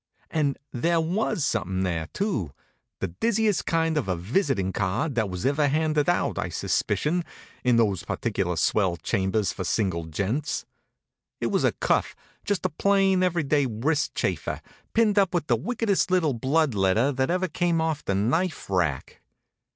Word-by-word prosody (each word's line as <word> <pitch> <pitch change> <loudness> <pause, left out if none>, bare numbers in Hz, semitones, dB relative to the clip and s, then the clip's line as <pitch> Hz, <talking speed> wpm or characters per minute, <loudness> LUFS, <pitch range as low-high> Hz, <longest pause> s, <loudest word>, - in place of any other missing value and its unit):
And 145 -4 0
there 165 +7 +1
was 170 -1 0
something 95 +1 -1
there, 85 -3 -1
too; 185 - -1 0.5
the 95 - -1
dizziest 215 - 0
kind 165 -1 +1
of 140 - -1
a 90 - 0
visitin' 100 - 0
card 105 - -1
that 110 -4 0
was 90 +4 -4
ever 145 +2 +2
handed 155 +1 +1
out, 175 - +1
I - - -2
suspicion, 170 +4 0 0.4
in 125 -1 +4
those 105 -6 +2
particular 95 -3 -2
swell 90 0 +1
chambers 95 +5 0
for 95 - -4
single 90 -3 0
gents. 105 - -2 0.7
It - - -1
was - - +1
a - - +3
cuff, - - 0 0.3
just 205 -5 -1
a - - +3
plain, 195 +2 +2
every 175 -3 +1
day 140 -1 +2
wrist 140 +8 -1
chafer, - - -2 0.3
pinned 215 -2 +4
up 190 -2 +2
with 170 - 0
the 120 - +3
wickedest 210 - 0
little 175 -6 +2
blood 135 +4 +1
letter 100 +7 +2
that 130 -1 0
ever 185 +1 +1
came 170 0 0
off 160 -2 -1
the 100 - -1
knife 150 - 0
rack. 85 -8 -1
140 Hz, 165 wpm, -26 LUFS, -, 0.7 s, in